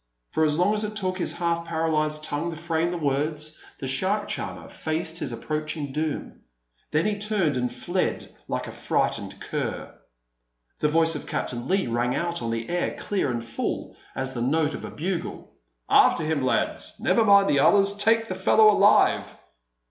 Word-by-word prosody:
For 160 - +1
as 150 -1 +3
long 180 +4 +3
as 215 0 -1
it 210 0 -4
took 185 -3 -1
his - - 0
half 170 -1 -1
paralysed 155 -2 0
tongue 155 +2 -2
to 165 - -6
frame 165 0 0
the 175 - -3
words, 150 +1 -1 0.2
the 135 - -5
shark 190 +11 0
charmer - - -5
faced 160 +1 -3
his 135 - -2
approaching 155 +3 -3
doom. 155 +1 -3 0.5
Then 155 +2 +1
he 210 -1 0
turned 205 -8 0
and 125 -1 -1
fled 175 +8 -2
like - - -2
a - - -7
frightened - - -1
cur. - - -4 0.9
The 150 - +2
voice 165 +1 +3
of 150 - -5
Captain 120 0 -3
Leigh 195 +4 +1
rang 120 +1 0
out 170 -3 -1
on 115 - -2
the 115 0 -3
air 175 0 -1
clear 195 -8 -1
and 120 -2 -3
full 115 0 -4 0.2
as 130 0 -2
the 120 - -4
note 150 +4 +1
of - - -7
a - - -6
bugle: 175 +2 -4 0.4
"After 165 - +5
him, 155 -2 0
lads! 130 - 0
Never 230 - +3
mind 200 -2 +6
the 140 - +3
others! 200 +6 +5
Take 225 +2 +2
the 185 - -3
fellow 215 +3 +5
alive!" - - +4
160 Hz, 180 wpm, -25 LUFS, 145-185 Hz, 0.9 s, mind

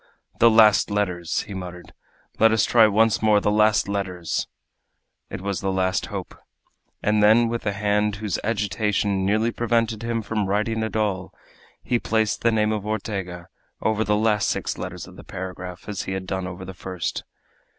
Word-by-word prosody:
"The 115 - +7
last 110 -3 +5
letters!" 90 -5 -1
he 105 - -9
muttered. 90 -2 -8 0.5
"Let 115 +1 +6
us 110 -1 +3
try 115 -2 +6
once 110 +1 +3
more 105 -1 +4
the 105 - +1
last 105 -1 +3
letters!" 95 -4 -2 0.8
It - - -6
was 100 -2 -3
the 95 - -1
last 95 0 0
hope. - - -6 0.7
And 105 0 +2
then, 110 +3 +5
with 115 -2 -3
a - - +2
hand 105 0 +1
whose 105 -3 -3
agitation 105 -2 0
nearly 110 +3 +2
prevented 115 -2 0
him 115 -1 -2
from 105 -1 -2
writing 110 +3 0
at 110 0 -3
all, 100 -4 -1 0.5
he 120 - +1
placed 110 -2 0
the 115 - +3
name 105 -1 +2
of 105 -2 -2
Ortega 100 -5 -4 0.3
over 110 0 +1
the 105 -1 +1 0.2
six - - -1
last - - -8
letters - - -6
of - - -14
the - - -11
paragraph, 90 -1 -7
as 105 -3 -3
he 95 - -4
had 95 -1 -4
done 95 -1 -3
over 95 +1 -7
the 95 - -7
first. 90 -1 -4
105 Hz, 180 wpm, -23 LUFS, 95-110 Hz, 0.8 s, The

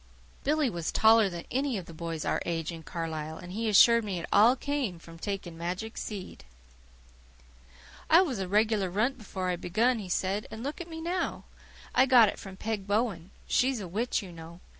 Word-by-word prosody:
Billy 300 0 +2
was 170 -8 -3
taller 220 -2 +5
than 175 -2 -7
any 265 -3 0
boy 170 -1 -8
of 165 - -2
his 160 - -1
age 165 -1 -2
in 165 -1 -8
Carlisle, 160 -1 -5
and 180 - -10
he 220 +3 -1
assured 230 +3 +6
me 200 -4 -3
it 170 - -4
all 230 +5 +6
came 270 -9 -2
from 165 0 -13
taking 195 -3 -4
magic 180 +7 -4
seed. 200 -4 -7 1.7
"I 335 +4 +7
was 265 - -3
a 190 - -2
regular 210 -1 +2
runt 235 +8 0
before 190 -3 -4
I 175 - -2
begun," 225 +8 +1
he 195 -3 -7
said, 195 +3 -1
"and 220 +1 -8
look 285 +5 -4
at 345 - -8
me 320 0 -7
now. 350 +2 -2 0.5
I 260 +1 +5
got 240 -5 +7
it - - -7
from 190 -1 -10
Peg 210 -2 -3
Bowen. 200 -5 -1 0.2
She's 260 -1 +2
a 195 - -6
witch, 220 +5 -1
you 185 - -9
know. 165 +1 -11
205 Hz, 195 wpm, -29 LUFS, 175-240 Hz, 1.7 s, I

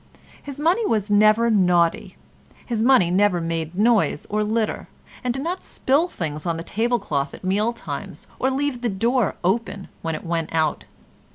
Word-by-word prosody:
His 285 -1 -8
money 345 +9 +2
was 215 - 0
never 215 +3 +4
naughty; 180 -5 +2 0.5
his 230 -3 -2
money 235 -8 +4
never 190 -1 +3
made 165 0 -3
noise 220 0 +2
or 210 0 +1
litter, 215 +1 -1 0.4
and 250 - 0
did 270 +3 -3
not 355 +3 -3
spill 285 +7 +1
things 155 - -5
on 165 -1 0
the 165 - -5
tablecloth 205 - -1
at - - -15
meal 205 +5 +1
times, 235 - -7
or 260 - +2
leave 270 -2 -2
the 240 - 0
door 230 +1 +1
open 195 +1 -1
when 165 -1 -2
it 155 - -8
went 165 -1 -2
out. 155 -2 0
210 Hz, 170 wpm, -22 LUFS, 175-240 Hz, 0.5 s, never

